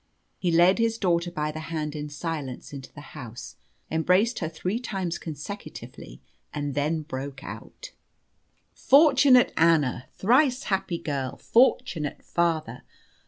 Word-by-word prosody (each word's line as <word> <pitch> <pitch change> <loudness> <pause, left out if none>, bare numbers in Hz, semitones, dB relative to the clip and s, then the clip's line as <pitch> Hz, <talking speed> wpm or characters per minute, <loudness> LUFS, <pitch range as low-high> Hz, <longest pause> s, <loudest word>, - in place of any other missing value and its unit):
He 180 - 0
led 175 +5 +5
his 230 0 +1
daughter 175 -4 +1
by 150 -3 -2
the 155 - -7
hand 155 -2 -3
in 150 0 -5
silence 145 -4 -5
into 135 -2 -9
the 145 0 -12
house, 120 -5 -9 0.4
embraced 180 +9 +2
her 160 - -2
three 180 +7 -3
times 190 -8 -3
consecutively, 150 - -9 0.3
and 145 -1 -3
then 155 +3 -1
broke 135 -2 -6
out - - -9 0.8
"Fortunate 275 -3 +5
Anna! 155 -7 +2
Thrice 255 +5 +3
happy 190 -3 -1
girl! 140 -5 -3
Fortunate 230 - +1
father! 160 -8 -1
165 Hz, 125 wpm, -26 LUFS, 145-200 Hz, 0.8 s, led